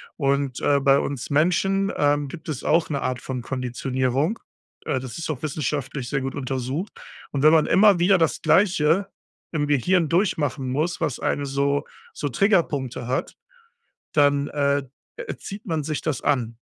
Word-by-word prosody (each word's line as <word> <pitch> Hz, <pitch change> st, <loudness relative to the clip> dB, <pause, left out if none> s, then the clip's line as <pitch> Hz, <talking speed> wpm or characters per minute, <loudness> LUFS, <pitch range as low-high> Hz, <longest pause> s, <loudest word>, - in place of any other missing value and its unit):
Und, 140 Hz, -2 st, 0 dB
äh, 140 Hz, -1 st, +3 dB
bei 135 Hz, 0 st, +4 dB
uns 140 Hz, -4 st, -4 dB
Menschen, 195 Hz, +6 st, +2 dB
ähm, 145 Hz, 0 st, +2 dB
gibt 160 Hz, +3 st, -9 dB
es 145 Hz, -5 st, -4 dB
auch 165 Hz, +2 st, +2 dB
'ne 140 Hz, -3 st, -2 dB
Art 125 Hz, -1 st, -2 dB
von 130 Hz, -1 st, -4 dB
Konditionierung. 130 Hz, -, -1 dB, 0.5 s
Äh, 130 Hz, -, 0 dB
das 130 Hz, -2 st, -7 dB
ist 165 Hz, -, -5 dB
auch 145 Hz, -5 st, -3 dB
wissenschaftlich 140 Hz, -3 st, -3 dB
sehr 135 Hz, -2 st, -1 dB
gut 135 Hz, 0 st, -4 dB
untersucht. 135 Hz, -, -3 dB, 0.4 s
Und 140 Hz, 0 st, -2 dB
wenn 155 Hz, -, +8 dB
man 160 Hz, -1 st, +5 dB
immer 200 Hz, -2 st, +5 dB
wieder 190 Hz, +3 st, +5 dB
das 165 Hz, -3 st, 0 dB
Gleiche 170 Hz, +1 st, +3 dB, 0.4 s
im 150 Hz, -3 st, -1 dB
Gehirn 160 Hz, +4 st, +2 dB
durchmachen 160 Hz, -7 st, 0 dB
muss, 160 Hz, +5 st, -1 dB
was 135 Hz, -, -1 dB
eine 145 Hz, -, -1 dB
so 140 Hz, +1 st, 0 dB, 0.3 s
so 145 Hz, -, -3 dB
Triggerpunkte 145 Hz, -, +1 dB
hat, 130 Hz, -, -2 dB, 0.8 s
dann, 145 Hz, -1 st, +3 dB
äh, 140 Hz, -1 st, +1 dB, 0.4 s
äh, -, -, -6 dB
erzieht 200 Hz, +3 st, -7 dB
man 160 Hz, -4 st, -1 dB
sich 155 Hz, 0 st, -3 dB
das 155 Hz, -4 st, -2 dB
an. 120 Hz, -6 st, 0 dB
145 Hz, 165 wpm, -23 LUFS, 135-165 Hz, 0.8 s, wenn